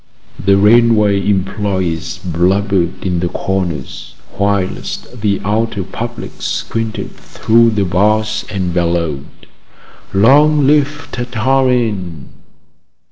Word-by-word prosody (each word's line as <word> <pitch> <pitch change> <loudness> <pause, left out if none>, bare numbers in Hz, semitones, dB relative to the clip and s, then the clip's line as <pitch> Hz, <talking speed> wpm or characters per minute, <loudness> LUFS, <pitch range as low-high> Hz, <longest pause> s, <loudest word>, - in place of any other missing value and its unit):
The 100 0 +4
railway 105 -1 +4
employees 95 -4 -2
blubbered 90 +1 0
in 90 -2 0
the 90 0 -1
corners, 90 -9 -4 0.2
whilst 100 +4 -2
the 100 -2 +1
outer 105 -1 -1
public - - -6
squinted 115 -1 -3
through 115 +1 +2
the 105 -3 0
bars 105 +4 +1
and 95 -4 -2
bellowed: 85 -5 -1 0.9
"Long 145 +8 +4
live 145 0 +1
Tartarin!" 120 - -1
100 Hz, 90 wpm, -15 LUFS, 90-115 Hz, 0.9 s, The